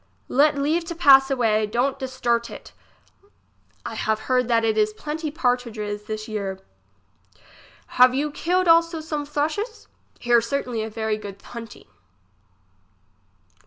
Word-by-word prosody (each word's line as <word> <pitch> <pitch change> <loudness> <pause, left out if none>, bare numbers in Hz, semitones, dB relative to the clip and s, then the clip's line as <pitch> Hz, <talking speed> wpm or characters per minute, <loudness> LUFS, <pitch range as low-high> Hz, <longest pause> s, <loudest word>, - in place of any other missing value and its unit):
Let 290 +2 +3
leave 310 +5 0
to 340 - -6
pass 270 -5 +6
away, 220 -5 +1
don't 250 +5 -1
disturte 245 -3 -1
it. - - -11 1.1
I - - -5
have 220 0 -1
heard 250 0 +1
that 230 -2 +2
it 220 -1 +1
is 215 0 +1
plenty 305 +6 -5
pardridges 230 -7 -2
this 215 0 -5
year. 200 -3 -4 1.4
Have 255 0 +7
you 295 +2 -1
killed 360 +4 0
also 330 0 +4
some 300 -2 -4
thrushes. 315 +11 -3 0.3
Here 240 -1 +3
certainly 240 -1 -3
a 220 - -4
very 220 0 -2
good 200 -2 -9
hunting. 230 -2 -10
250 Hz, 130 wpm, -23 LUFS, 220-295 Hz, 1.4 s, Have